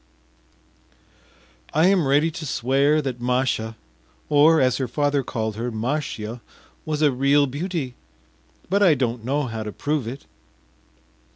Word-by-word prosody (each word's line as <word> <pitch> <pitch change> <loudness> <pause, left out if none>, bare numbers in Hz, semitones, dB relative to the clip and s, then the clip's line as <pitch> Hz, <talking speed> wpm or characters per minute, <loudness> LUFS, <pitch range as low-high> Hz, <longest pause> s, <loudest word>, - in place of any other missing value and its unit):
I 160 +2 +4
am 185 -6 +3
ready 145 +4 +3
to 160 0 -7
swear 140 +5 +2
that 125 -3 -4
Masha 125 -3 0 0.5
or, 155 +2 +5
as 130 -2 +2
her 130 - -2
father 145 +3 0
called 110 -4 -4
her, 120 +2 -2
Mashya 115 -1 -3 0.4
was 155 0 -1
a 145 - +5
real 140 +3 +3
beauty, 145 -1 -4 0.7
but 200 +3 +1
I 180 -6 +6
don’t 120 -3 -2
know 140 +5 0
how 115 -4 -4
to 105 -1 -5
prove 145 +1 -2
it. 130 +4 -7
135 Hz, 135 wpm, -23 LUFS, 120-150 Hz, 0.7 s, I